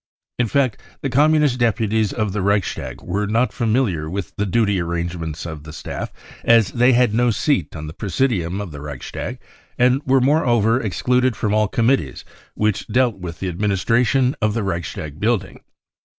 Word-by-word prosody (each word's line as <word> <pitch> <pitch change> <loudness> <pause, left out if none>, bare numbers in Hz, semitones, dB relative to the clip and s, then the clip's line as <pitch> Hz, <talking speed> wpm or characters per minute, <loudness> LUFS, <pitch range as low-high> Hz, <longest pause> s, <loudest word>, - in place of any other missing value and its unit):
In 120 - +2
fact, 130 -2 0 0.2
the 135 - -2
Com 145 +4 +4
munist 150 -5 +2
deputies 110 -2 +1
of 110 -4 -2
the 105 - -1
Reichstag 100 0 -1
were 100 +4 -2
not 115 +4 +1
familiar 110 - 0
with 95 0 -5
the 105 - -1
duty 100 -1 +2
arrangements 85 -2 -4
of 80 -3 -7
the 80 - -9
staff, 80 - -6 0.3
as 115 -3 +4
they 125 +2 +4
had 120 -2 +3
no 120 +2 +3
seat 115 - 0
on 80 -1 -6
the 75 - -7
presidium 100 -3 -1
of 100 -5 -5
the 70 -1 -8
Reichstag 75 0 -6 0.4
and 125 +2 +3
were 135 0 +3
moreover 125 -4 +3
ex 105 -5 -4
cluded 125 -1 +2
from 105 +1 -1
all 110 0 +3
Committees 115 - 0 0.3
which 105 -2 0
dealt 120 -2 +1
with 85 -2 -6
the 95 -2 -2
adminis 95 0 -1
tration 125 +3 +3
of 110 -1 +1
the 115 - -1
Reichstag 85 -5 -4
building. 110 -1 -1
110 Hz, 180 wpm, -21 LUFS, 90-125 Hz, 0.4 s, Com